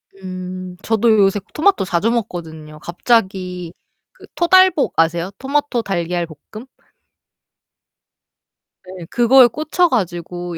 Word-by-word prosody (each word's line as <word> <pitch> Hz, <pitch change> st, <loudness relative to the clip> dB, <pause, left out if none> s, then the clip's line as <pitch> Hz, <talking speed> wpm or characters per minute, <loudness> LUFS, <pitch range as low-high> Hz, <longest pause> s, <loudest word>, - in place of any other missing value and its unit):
음. 185 Hz, -1 st, -8 dB
저도 225 Hz, +1 st, +1 dB
요새 195 Hz, +1 st, +3 dB
토마토 355 Hz, -, +2 dB
자주 185 Hz, +6 st, 0 dB
먹거든요. 160 Hz, -9 st, -5 dB
갑자기 180 Hz, -3 st, -1 dB, 0.4 s
그 -, -, -16 dB
토달볶 370 Hz, -3 st, +4 dB
아세요? 170 Hz, +3 st, +1 dB
토마토 275 Hz, -3 st, -1 dB
달걀 175 Hz, -3 st, -2 dB, 0.3 s
볶음? 220 Hz, +4 st, -10 dB, 2.2 s
네. 185 Hz, -2 st, -10 dB
그거에 245 Hz, +1 st, +5 dB
꽂혀 310 Hz, +7 st, 0 dB
가지고 175 Hz, -, -3 dB
190 Hz, 225 characters per minute, -18 LUFS, 175-240 Hz, 2.2 s, 그거에